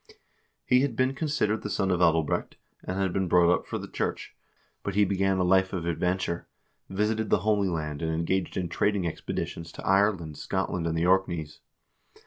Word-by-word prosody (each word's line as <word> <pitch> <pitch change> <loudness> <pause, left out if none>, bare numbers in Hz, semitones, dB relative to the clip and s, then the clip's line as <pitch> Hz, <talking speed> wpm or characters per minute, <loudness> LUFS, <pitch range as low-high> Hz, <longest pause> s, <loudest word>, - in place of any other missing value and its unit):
He 125 0 +4
had 135 -4 0
been 130 +2 +2
con 155 +3 -3
sidered 110 -7 0
the 105 - -5
son 95 -2 0
of 90 - +1
Adalbrecht, 80 -2 +2 0.3
and 95 - -4
had 95 -2 0
been 95 -1 0
brought 85 0 +5
up - - -2
for - - -3
the - - -7
church, - - -4 0.5
but 100 - -4
he 105 0 +5
began 95 0 +1
a 90 - +2
life 95 +1 +3
of 85 -3 -3
adventure, 90 0 -1 0.4
visited 105 +2 0
the - - +3
Holy 105 -3 +2
Land, 75 -3 -3
and 80 -1 -1
engaged 85 +4 -1
in 90 -1 -1
trading 100 +2 0
expeditions 85 0 -4
to - - -9
Ireland, 95 -6 +2
Scotland, 85 -2 -2
and 80 0 -1
the 85 - +1
Orkneys. 85 -5 +1
95 Hz, 190 wpm, -27 LUFS, 85-100 Hz, 0.5 s, brought